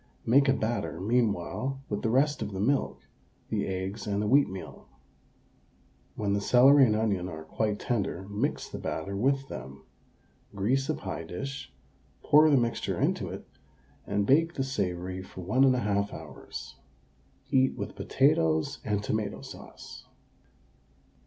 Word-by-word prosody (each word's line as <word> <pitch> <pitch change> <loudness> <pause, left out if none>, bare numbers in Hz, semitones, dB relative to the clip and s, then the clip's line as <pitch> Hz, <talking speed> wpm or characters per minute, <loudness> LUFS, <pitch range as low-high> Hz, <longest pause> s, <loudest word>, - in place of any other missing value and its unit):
Make 135 +4 +5
a - - +5
batter 105 - -2
meanwhile 115 +4 0
with 105 - -3
the 110 - 0
rest 140 +4 +2
of 105 -2 -4
the 95 - -4
milk, 135 +7 0 0.4
the - - -1
eggs 95 +3 -4
and 100 -1 0
the 105 - 0
wheatmeal. 115 -7 0 1.3
When 100 -2 -1
the 100 - 0
celery 135 +5 +6
and 105 - +2
onion 100 -5 0
are 80 -2 -7
quite 105 +6 -1
tender 100 -6 -2
mix 105 +1 -2
the - - -7
batter 95 +5 -4
with 135 +5 +1
them; 65 - -9 0.7
grease 130 +8 0
a 155 - +1
pie 95 -5 -5
dish, 135 - -6 0.5
pour 155 +1 +6
the 145 - +5
mixture 120 -2 -1
into - - 0
it, - - -8 0.6
and 100 0 0
bake 165 +8 +3
the 135 - 0
savoury 95 -7 -3
for 95 0 -10
1 110 +10 +3
1/2 105 -6 +1
hours. - - -9 0.7
Eat 130 0 +3
with - - -5
potatoes 80 - +2
and 105 -1 -1
tomato 105 -1 -2
sauce. - - -11
105 Hz, 145 wpm, -28 LUFS, 95-135 Hz, 1.3 s, celery